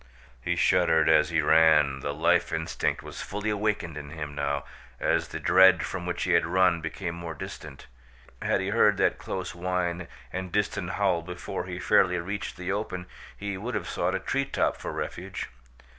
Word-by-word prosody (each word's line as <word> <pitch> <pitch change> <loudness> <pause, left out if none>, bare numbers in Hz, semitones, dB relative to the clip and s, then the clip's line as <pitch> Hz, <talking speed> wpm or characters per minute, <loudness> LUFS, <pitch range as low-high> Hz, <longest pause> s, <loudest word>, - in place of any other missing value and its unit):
He - - -1
shuddered 80 -3 +3
as 75 0 +5
he 85 -2 +1
ran. 75 -3 +5
The 70 +1 -3
life 80 +4 +2
instinct - - -1
was - - -8
fully 105 +2 -3
awakened 105 -7 -1
in 70 -1 -9
him 75 -2 -6
now, 70 -1 -1 0.4
as - - +1
the - - -6
dread 95 -1 +6
from 90 -1 -5
which 90 - -2
he 90 - 0
had 85 - +5
run 90 -1 +3
became 85 +2 -4
more 85 -1 -6
distant. 80 -7 -9 0.6
Had - - +1
he - - -2
heard - - +4
that - - +2
close 95 -1 -4
whine 90 -1 -2 0.3
and 95 -1 -4
distant 105 -2 -1
howl 95 -4 +1
before 90 +1 -5
he 90 -1 -5
fairly 90 0 +3
reached 95 +4 -4
the 90 +1 -3
open 95 -3 -3 0.3
he 100 -2 -4
would 120 +4 -4
have - - -3
sought 90 +2 -1
a - - -1
treetop 135 +7 0
for - - -6
refuge. 95 +2 -5
90 Hz, 180 wpm, -27 LUFS, 80-95 Hz, 0.6 s, dread